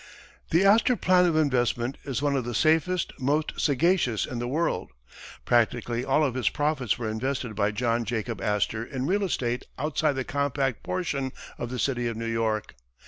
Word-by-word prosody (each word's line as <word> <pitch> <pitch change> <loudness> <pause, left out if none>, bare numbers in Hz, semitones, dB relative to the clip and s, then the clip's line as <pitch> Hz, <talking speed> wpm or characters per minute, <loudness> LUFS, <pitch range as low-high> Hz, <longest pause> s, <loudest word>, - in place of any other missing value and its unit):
The 170 +4 +3
Astor 220 +5 +5
plan 180 -4 +4
of 165 - +1
investment 125 -4 +1
is 135 -1 -2
one 145 -1 +2
of 130 - 0
the 120 0 -4
safest, 165 +6 +2
most 145 +4 +1
sagacious 145 - +2
in 120 - -5
the 120 - -2
world. 145 - -1 0.6
Practically 120 0 +1
all 135 +4 +2
of 135 -5 +1
his 125 -4 +1
profits 145 -6 0
were 120 -2 -3
invested 120 +1 -3
by 100 0 +2
John 115 +2 0
Jacob 115 0 -3
Astor 105 +2 0
in 130 +2 -4
real 200 +6 +1
estate 125 -9 -2
outside 150 0 0
the 135 -1 -2
compact 140 -2 -1
portion 145 -8 -2 0.3
of 120 - -3
the 125 - -4
city 120 -2 0
of 115 -1 -3
New 115 - -4
York. 115 -2 -1
130 Hz, 180 wpm, -26 LUFS, 115-155 Hz, 0.6 s, Astor